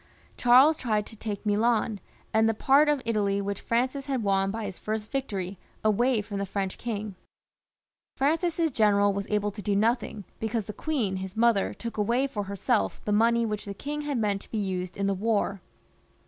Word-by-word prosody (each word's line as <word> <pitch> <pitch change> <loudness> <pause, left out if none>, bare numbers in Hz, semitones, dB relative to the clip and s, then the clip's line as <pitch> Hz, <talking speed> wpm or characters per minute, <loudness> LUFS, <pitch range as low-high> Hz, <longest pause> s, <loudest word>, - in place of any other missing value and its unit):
Charles 260 +6 +6
tried 215 -6 0
to 225 - -10
take 210 -1 -5
Milan 215 0 +1 0.3
and 220 0 +4
the 225 - 0
part 280 +6 +4
of 290 -3 +1
Italy 205 -3 +1
which 200 0 -3
Francis 260 +4 -1
had 265 -4 -1
won 195 -1 +2
by 220 +2 -3
his 195 -3 -6
first 215 0 -4
victory, 200 -9 -3 0.2
away 220 +2 +2
from 200 -1 -5
the 200 - -1
French 195 -1 -3
king, 215 -3 -4 1.0
Francis's 325 +3 +1
general 205 -3 +3
was 200 0 -4
able 210 -1 0
to 205 - -8
do 200 +1 0
nothing, 220 0 0 0.2
because 220 -1 -2
the 210 - -6
queen, 230 -9 -1
his 190 +2 -6
mother, 230 -3 +3
took 230 -1 -6
away 235 +6 +2
for 210 -7 -3
herself 185 - 0
the 210 - -1
money 230 +2 +3
which 210 -2 -3
the 200 -1 -6
king 295 +7 -4
had 290 -3 -2
meant 205 -3 0
to - - -14
be 225 - -3
used 185 -3 -3
in 200 - 0
the 200 - +2
war. 200 -1 0
215 Hz, 190 wpm, -27 LUFS, 200-240 Hz, 1.0 s, Charles